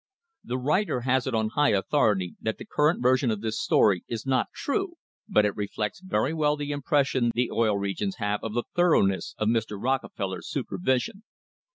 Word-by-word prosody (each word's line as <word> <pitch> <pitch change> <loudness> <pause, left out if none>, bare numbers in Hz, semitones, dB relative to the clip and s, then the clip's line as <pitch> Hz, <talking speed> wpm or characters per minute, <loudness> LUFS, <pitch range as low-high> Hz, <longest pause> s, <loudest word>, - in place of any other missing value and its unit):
The 125 - -3
writer 150 +1 0
has 130 +1 +1
it 130 - -1
on 110 -1 +1
high 145 0 +2
authority 100 - +1
that 110 - -2
the - - -9
current 150 -2 +1
version 130 0 +3
of 110 -2 -2
this 110 0 -2
story 95 -5 +3
is 115 0 -5
not 130 -2 +1
true, 360 +4 -2 0.3
but 105 - +4
it 105 - -1
reflects 105 +4 -3
very 185 -5 0
well 150 -2 +2
the 145 0 -4
impression 140 -4 +1
the 120 +1 0
Oil 110 -3 +2
Re 100 0 -2
gions 100 0 -3
have 105 0 -2
of 110 -1 -4
the 120 - +1
thoroughness 100 - +2
of 110 - 0
Mr. 110 -2 0
Rockefeller's 115 -5 -2
super 140 - -4
vision. 130 - 0
120 Hz, 190 wpm, -26 LUFS, 105-145 Hz, 0.3 s, but